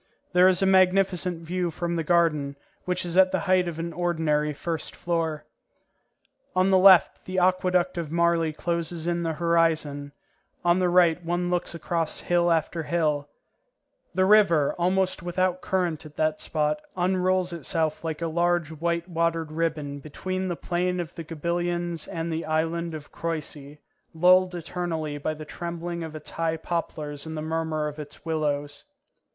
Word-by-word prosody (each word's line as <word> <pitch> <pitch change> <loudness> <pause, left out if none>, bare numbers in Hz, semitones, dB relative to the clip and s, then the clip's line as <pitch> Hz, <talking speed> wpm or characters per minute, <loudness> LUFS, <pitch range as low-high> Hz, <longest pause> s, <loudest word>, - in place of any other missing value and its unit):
There 180 +1 +6
is 185 0 +3
a - - +4
magnificent 185 -2 +3
view 175 +1 -1
from 170 +1 -3
the 165 - -1
garden, 155 -4 +2 0.3
which 180 0 -1
is 175 +1 -2
at 185 0 +6
the - - 0
height 185 -2 +2
of 170 -2 -4
an 165 0 -4
ordinary 160 -4 0
first 160 +2 -4
floor. 165 -3 -2 1.1
On 185 +1 +3
the 190 - +6
left 185 -2 +6
the 185 0 -4
Aqueduct 180 -1 +2
of 165 -3 -4
Marly 170 -1 +2
closes 170 +1 -2
in 175 0 0
the 165 -1 -1
horizon, 160 -3 +1 0.5
on 175 +1 +4
the 180 -1 +2
right 175 -1 +4
one 175 +1 -1
looks 175 -1 -1
across 165 -1 -2
hill 175 0 +2
after 165 +1 0
hill; 150 -3 0 0.9
the 185 0 +3
river, 190 -8 +5
almost 185 +2 +1
without 180 +1 0
current 175 -5 -1
at 150 -1 -13
that 155 0 0
spot, 150 0 -1 0.2
unrolls 185 0 +1
itself 160 -1 -1
like 160 0 -3
a - - 0
large 170 -1 +1
white 170 +2 -2
watered 165 -2 -1
ribbon 155 -3 -2
between 185 +6 -4
the 175 - -2
plain 180 +1 -1
of 170 -2 -5
the 165 - -7
Gabillons 170 +1 -2
and 165 -2 -3
the 160 +1 -3
island 165 +1 -1
of 150 -2 -10
Croissy, 150 -3 -5 0.4
lulled 180 +2 +5
eternally 165 -3 -3
by 155 +2 -2
the 155 0 -8
trembling 170 +1 -5
of 160 -1 -6
its 155 - -7
high 165 -1 -1
poplars 155 -3 -4
and 160 0 -5
the 155 - -3
murmur 160 -1 -1
of 150 +1 -7
its 150 +1 -10
willows. 145 -3 -2
170 Hz, 165 wpm, -26 LUFS, 155-180 Hz, 1.1 s, There